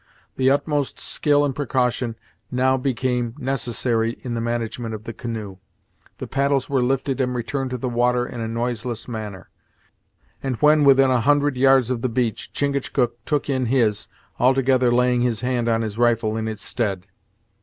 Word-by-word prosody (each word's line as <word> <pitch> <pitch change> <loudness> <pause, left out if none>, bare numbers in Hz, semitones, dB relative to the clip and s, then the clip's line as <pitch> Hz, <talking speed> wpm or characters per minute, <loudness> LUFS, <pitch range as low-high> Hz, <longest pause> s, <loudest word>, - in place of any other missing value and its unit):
The 130 0 +3
utmost 145 0 0
skill 145 -1 +2
and 135 -3 -2
precaution 125 -3 -1 0.3
now 130 +1 +2
became 125 -2 -1
necessary 120 -4 -1
in 125 - -4
the 115 - -2
management 115 -1 -3
of 110 - -9
the 115 - -6
canoe. 110 -4 -6 0.6
The - - -5
paddles 140 -1 0
were 135 -2 +1
lifted 135 +1 0
and 125 -1 -1
returned 130 +3 -2
to 125 - -3
the 125 - -3
water 120 0 +1
in 120 -1 -7
a 115 - -2
noiseless 115 0 -3
manner; 105 -5 -7 0.9
and 135 -2 -2
when 150 +3 +4
within 135 -1 +6
a 125 -2 +2
hundred 145 +2 +2
yards 130 -1 +4
of 120 -2 -2
the 130 - 0
beach, 115 -2 -2
Chingachgook 130 -4 -1
took 150 -2 0
in 130 -3 0
his, 115 -5 +1 0.3
altogether 130 -1 +3
laying 125 0 +3
his 120 -3 0
hand 125 -2 0
on 115 0 +1
his 110 0 -5
rifle 115 -2 +2
in 110 0 -2
its 110 -2 -4
stead. 100 -6 -2
125 Hz, 170 wpm, -22 LUFS, 115-135 Hz, 0.9 s, within